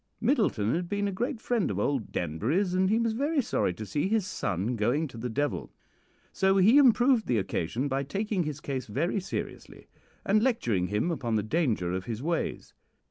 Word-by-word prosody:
"Middleton 215 Hz, -, +1 dB
had 175 Hz, +1 st, -2 dB
been 205 Hz, 0 st, 0 dB
a -, -, -1 dB
great 235 Hz, +6 st, -2 dB
friend 230 Hz, -3 st, 0 dB
of 100 Hz, -, -3 dB
old 125 Hz, +3 st, -1 dB
Danbury's, 125 Hz, -, -1 dB
and 185 Hz, +1 st, +2 dB
he 220 Hz, -, +3 dB
was 230 Hz, -1 st, +1 dB
very 285 Hz, +6 st, 0 dB
sorry 225 Hz, -, 0 dB
to 110 Hz, -, -6 dB
see 145 Hz, -, -1 dB
his 215 Hz, -1 st, +1 dB
son 105 Hz, -, -2 dB
going 125 Hz, +9 st, +1 dB
to 125 Hz, -, -14 dB
the 125 Hz, +2 st, -3 dB
devil; 145 Hz, +5 st, -2 dB, 0.6 s
so 190 Hz, 0 st, +3 dB
he 215 Hz, +9 st, +6 dB
improved 245 Hz, -2 st, +4 dB
the 120 Hz, -, +2 dB
occasion 105 Hz, -, -2 dB
by 135 Hz, 0 st, -1 dB
taking 195 Hz, +7 st, -2 dB
his 150 Hz, -3 st, -3 dB
case 135 Hz, -5 st, -4 dB
very 165 Hz, -, -1 dB
seriously, 190 Hz, -, -6 dB, 0.4 s
and 210 Hz, +2 st, +3 dB
lecturing 120 Hz, -, +1 dB
him 105 Hz, -, 0 dB
upon 120 Hz, -8 st, -2 dB
the 105 Hz, -, +1 dB
danger 110 Hz, -, 0 dB
of 95 Hz, 0 st, -3 dB
his 115 Hz, +1 st, -5 dB
ways. 170 Hz, +1 st, -2 dB
155 Hz, 190 wpm, -28 LUFS, -, 0.6 s, he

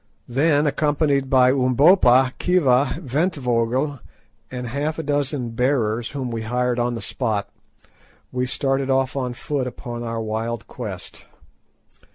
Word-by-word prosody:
Then, 145 Hz, +4 st, +2 dB
accompanied 145 Hz, -2 st, +1 dB
by 130 Hz, -1 st, +5 dB
Umbopa, 130 Hz, 0 st, +4 dB
Khiva, 140 Hz, -7 st, +3 dB
Ventvögel, 130 Hz, -2 st, 0 dB, 0.5 s
and 125 Hz, -1 st, -5 dB
half 145 Hz, +6 st, -2 dB
a 160 Hz, -, -3 dB
dozen 145 Hz, -4 st, -1 dB
bearers 115 Hz, -2 st, 0 dB
whom 130 Hz, -4 st, -4 dB
we 115 Hz, -1 st, -3 dB
hired 125 Hz, +2 st, -1 dB
on 120 Hz, 0 st, 0 dB
the 115 Hz, -, -4 dB
spot, 110 Hz, -3 st, -2 dB, 0.8 s
we 125 Hz, 0 st, -1 dB
started 135 Hz, +1 st, -1 dB
off 130 Hz, 0 st, +1 dB
on 125 Hz, -3 st, -2 dB
foot 135 Hz, 0 st, -2 dB
upon 120 Hz, -1 st, -7 dB
our 115 Hz, -1 st, -3 dB
wild 110 Hz, +1 st, -3 dB
quest. -, -, -8 dB
130 Hz, 130 wpm, -22 LUFS, 120-140 Hz, 0.8 s, by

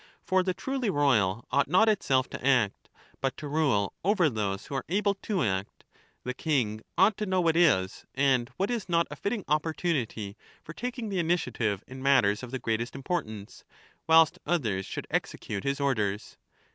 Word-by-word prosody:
For 185 Hz, 0 st, +2 dB
the 185 Hz, 0 st, -1 dB
truly 265 Hz, +2 st, -2 dB
ro3ral 120 Hz, -, +2 dB
ought 140 Hz, +1 st, +2 dB
not 185 Hz, +9 st, +4 dB
itself 135 Hz, -12 st, +2 dB
to -, -, -7 dB
act, 125 Hz, -7 st, +1 dB, 0.3 s
but 135 Hz, -1 st, -2 dB
to 150 Hz, -, -6 dB
rule 140 Hz, -10 st, +1 dB
over 185 Hz, -5 st, +3 dB
those 100 Hz, -3 st, -2 dB
who 145 Hz, -, -8 dB
are 135 Hz, -, -2 dB
able 200 Hz, +2 st, +2 dB
to 200 Hz, -3 st, -2 dB
act; 95 Hz, -2 st, -3 dB, 0.4 s
the 125 Hz, -, -3 dB
king 125 Hz, -7 st, -1 dB, 0.2 s
ought 195 Hz, +3 st, +4 dB
to 210 Hz, -, -3 dB
know 185 Hz, 0 st, +1 dB
what 165 Hz, -2 st, +2 dB
is 120 Hz, -, +2 dB
and 130 Hz, -3 st, +2 dB
what 195 Hz, +5 st, 0 dB
is 230 Hz, -6 st, -3 dB
not 170 Hz, -1 st, +3 dB
a -, -, -5 dB
fitting 205 Hz, 0 st, -3 dB
opportunity 150 Hz, -, -1 dB, 0.3 s
for 165 Hz, -, -9 dB
taking 245 Hz, +1 st, -4 dB
the 195 Hz, -2 st, -1 dB
initiative 125 Hz, -, 0 dB
in 130 Hz, +1 st, -10 dB
matters 130 Hz, -7 st, +3 dB
of 125 Hz, -, -7 dB
the 130 Hz, -, -3 dB
greatest 115 Hz, 0 st, -2 dB
importance, 130 Hz, -, -4 dB, 0.4 s
whilst 160 Hz, -1 st, +5 dB
others 115 Hz, -, -1 dB
should -, -, -5 dB
execute 100 Hz, -2 st, -3 dB
his 140 Hz, 0 st, -1 dB
orders. 105 Hz, -7 st, -1 dB
140 Hz, 175 wpm, -28 LUFS, 110-180 Hz, 0.4 s, whilst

